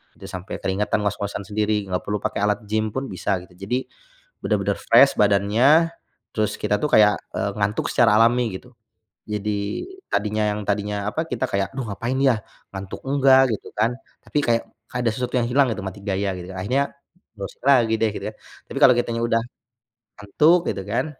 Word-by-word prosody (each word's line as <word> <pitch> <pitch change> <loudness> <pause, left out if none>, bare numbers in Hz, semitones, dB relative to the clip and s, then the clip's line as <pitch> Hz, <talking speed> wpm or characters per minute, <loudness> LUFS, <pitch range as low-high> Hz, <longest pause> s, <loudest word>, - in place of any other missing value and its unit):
Itu - - -11
sampai 95 0 -6
keringatan, 100 +2 0
ngos-ngosan 100 0 -3
sendiri, 105 -1 0
nggak 90 -1 -2
perlu 105 0 -2
pakai 110 +2 -3
alat 105 -1 +2
gim 110 +1 0
pun 130 +5 -3
bisa 95 +1 -1
gitu. 90 - -18 0.2
Jadi, 125 +4 0 0.6
benar-benar - - -1
fresh 140 - +6
badannya, 110 +11 +4 0.4
terus 105 -1 -1
kita 105 - +1
tuh 150 - 0
kayak, 105 -1 +6 0.2
eee, 100 - -1
ngantuk 105 +1 0
secara 115 -4 +4
alami 120 +1 +4
gitu. - - -10 0.5
Jadi, 105 -1 -3 0.3
tadinya 105 +1 0
yang, 105 - -3
tadinya 105 0 -1
apa, 160 - -2
kita 125 - -1
kayak, 100 0 -1
"Aduh 130 -4 -4
ngapain 115 +6 -3
ya? 130 -6 +2 0.3
Ngantuk 95 0 -7
enggak." 135 -3 +5
Gitu - - -12
kan, 110 +3 +2 0.3
tapi 150 - -1
kayak 115 -2 +2 0.3
kayak 125 -1 -2
ada - - +3
sesuatu 125 +1 -3
yang 120 - 0
hilang 135 +3 +3
gitu 105 - -4
mati 95 +1 -6
gaya 100 0 -1
gitu. 90 +1 -8
Akhirnya 125 +10 0 0.4
browsing 100 +2 -8
lagi 120 -5 +5
deh 110 - +2
gitu - - -7
ya - - -4
kan. - - -28 0.3
Tapi - - -7
kalau - - +8
kitanya 115 -1 -1
udah 115 0 +2 0.8
ngantuk 150 - +4
gitu 95 -2 -3
kan, 115 +6 -1
105 Hz, 185 wpm, -23 LUFS, 100-125 Hz, 0.8 s, kalau